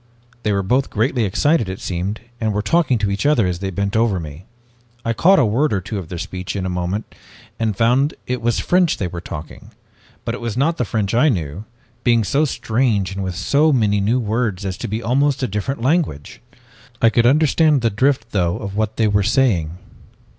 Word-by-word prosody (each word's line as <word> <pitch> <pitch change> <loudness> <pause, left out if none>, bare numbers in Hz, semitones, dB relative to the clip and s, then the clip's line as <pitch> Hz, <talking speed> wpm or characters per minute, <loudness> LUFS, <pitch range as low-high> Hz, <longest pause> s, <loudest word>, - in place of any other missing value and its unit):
"They 105 - 0
were 100 -1 0
both 130 +8 +1
greatly 115 +1 0
excited, 130 - +1
it 95 - -5
seemed, 95 +4 -3 0.2
and 110 -2 -1
were 105 - 0
talking 165 -5 +2
to 105 -2 -1
each 100 - -2
other 145 -9 +3
as 90 -1 -2
they 95 0 -3
bent 100 +2 -2
over 110 -4 +2
me. 80 +2 -9 0.6
I 115 - +1
caught 190 - +4
a 145 - +4
word 130 +8 +1
or 100 - +1
two 100 +3 -5
of 85 -4 -9
their 90 - -5
speech 90 +3 -5
in 95 -2 -2
a - - -2
moment, 90 +4 -3 0.5
and 110 -3 -1
found 125 +6 +2
it 125 -1 -3
was 120 0 +1
French 180 -2 +2
they 95 - -2
were 85 -1 -5
talking. 75 -2 -9 0.6
But - - -2
it - - -6
was 115 -1 -4
not 160 +5 +1
the 125 - 0
French 105 -1 -2
I 125 +7 +4
knew, 85 - -3 0.4
being 115 -2 +3
so 140 - +1
strange 110 -7 0
and 100 0 -4
with 95 -1 -4
so 145 - +2
many 105 -6 +2
new 115 +6 +1
words 110 -4 -1
as 95 -1 -2
to - - -5
be 110 +3 -3
almost 135 +3 +1
a - - +1
different 105 +5 -3
language. 135 - -1 0.6
I 115 - +4
could 120 0 +3
understand 155 +1 +3
the 115 -1 +1
drift, 130 +2 0
though, 90 -4 0
of 100 -2 -6
what 110 0 -1
they 110 - +3
were 105 0 +2
saying. 95 - +1
110 Hz, 215 wpm, -20 LUFS, 95-130 Hz, 0.6 s, caught